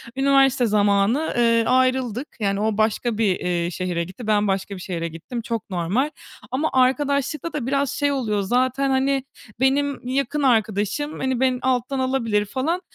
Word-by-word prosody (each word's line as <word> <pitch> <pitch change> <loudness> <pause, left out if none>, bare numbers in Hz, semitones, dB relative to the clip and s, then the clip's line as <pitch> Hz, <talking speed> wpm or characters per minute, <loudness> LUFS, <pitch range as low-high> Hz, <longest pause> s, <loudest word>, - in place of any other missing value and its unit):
Üniversite 270 -1 +3
zamanı, 205 +6 +2
eee, 230 -1 +4
ayrıldık. 255 0 +1
Yani, 200 -2 0
o 215 -1 0
başka 220 +1 0
bir, 205 -5 +2
eee, 175 -1 -1
şehre 175 -1 -2
gitti. 190 +7 -9
Ben 210 -1 +2
başka 195 +1 -2
bir 185 - -9
şehre 170 -2 -3
gittim, 170 +9 -6
çok 230 -1 -4
normal. 190 - 0 0.4
Ama 290 +5 0
arkadaşlıktada 280 +2 0
biraz 275 0 0
şey 285 -1 0
oluyor 220 -7 -1
zaten, 255 +6 +1
hani, 270 0 +1 0.4
"Benim 275 0 +1
yakın 275 +3 -1
arkadaşım, 220 +3 0
hani, 260 -2 -1
beni 255 -1 +1
alttan 260 +1 0
alabilir," 230 -6 0
falan. 275 - -2
250 Hz, 155 wpm, -22 LUFS, 205-270 Hz, 0.4 s, eee